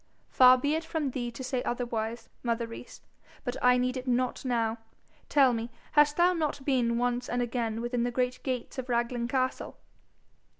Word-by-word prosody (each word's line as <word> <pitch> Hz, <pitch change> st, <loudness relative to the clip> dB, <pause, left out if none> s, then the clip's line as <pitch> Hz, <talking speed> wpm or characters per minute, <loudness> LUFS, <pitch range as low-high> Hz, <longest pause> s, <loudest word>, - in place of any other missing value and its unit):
'Far 255 Hz, 0 st, +7 dB
be 285 Hz, +4 st, 0 dB
it 320 Hz, +1 st, -1 dB
from 320 Hz, -4 st, -2 dB
thee 240 Hz, -1 st, -3 dB
to 235 Hz, +2 st, -8 dB
say 255 Hz, -1 st, -1 dB
otherwise, 235 Hz, -2 st, -3 dB
mother 235 Hz, -1 st, -1 dB
Rees. 230 Hz, +2 st, -10 dB, 0.4 s
But 245 Hz, -2 st, -3 dB
I 250 Hz, 0 st, +5 dB
need 250 Hz, +1 st, 0 dB
it 255 Hz, 0 st, -5 dB
not 250 Hz, 0 st, 0 dB
now. 230 Hz, -3 st, 0 dB, 0.5 s
Tell 270 Hz, -4 st, +5 dB
me, 230 Hz, 0 st, -3 dB, 0.2 s
hast 295 Hz, 0 st, +4 dB
thou 355 Hz, +1 st, +5 dB
not 300 Hz, -5 st, -2 dB
been 245 Hz, -4 st, +2 dB
once 245 Hz, 0 st, -1 dB
and 245 Hz, -, -1 dB
again 230 Hz, -2 st, -2 dB
within 240 Hz, 0 st, -1 dB
the 240 Hz, -, +1 dB
great 250 Hz, +1 st, -1 dB
gates 255 Hz, 0 st, -4 dB
of 255 Hz, 0 st, -6 dB
Raglan 235 Hz, 0 st, 0 dB
castle?' 255 Hz, 0 st, -2 dB
250 Hz, 180 wpm, -29 LUFS, 235-260 Hz, 0.5 s, Far